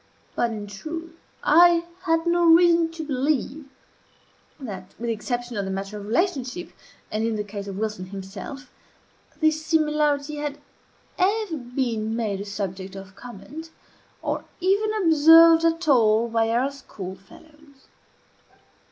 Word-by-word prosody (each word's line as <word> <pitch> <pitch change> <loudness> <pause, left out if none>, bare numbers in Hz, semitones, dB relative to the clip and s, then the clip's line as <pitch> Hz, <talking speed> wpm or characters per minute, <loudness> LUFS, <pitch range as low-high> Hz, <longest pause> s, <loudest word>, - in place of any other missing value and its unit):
But, 235 - +1
in 215 -2 -5
truth, 325 +11 -7 0.3
I 340 +2 +5 0.2
had 325 -1 +1
no 345 0 +3
reason 335 0 +5
to 325 -1 -6
believe 285 0 -2 0.9
that 195 -8 -8
(with 235 +1 -4
the - - +1
exception 240 +2 -4
of 200 - -1
the - - -4
matter 195 +2 -4
of 205 -1 -7
relationship, 295 - -1 0.4
and 215 +1 -1
in 225 -1 0
the 210 - -2
case 200 -1 -7
of 195 -1 -6
Wilson 210 -3 -3
himself) 195 +9 -8 0.7
this 315 0 +2
similarity 300 -2 +1
had 290 -1 -4 0.6
ever 400 -1 +1
been 240 -4 -2
made 210 -4 -2
a - - -6
subject 195 -1 -5
of 190 -1 -10
comment, 245 +9 -10 0.5
or - - -2 0.2
even 400 +4 +2
observed 325 +1 +7
at 330 0 +1
all 230 -4 +4
by 225 -1 +1
our 250 +4 +1
schoolfellows. 280 - -12
270 Hz, 135 wpm, -24 LUFS, 210-325 Hz, 0.9 s, observed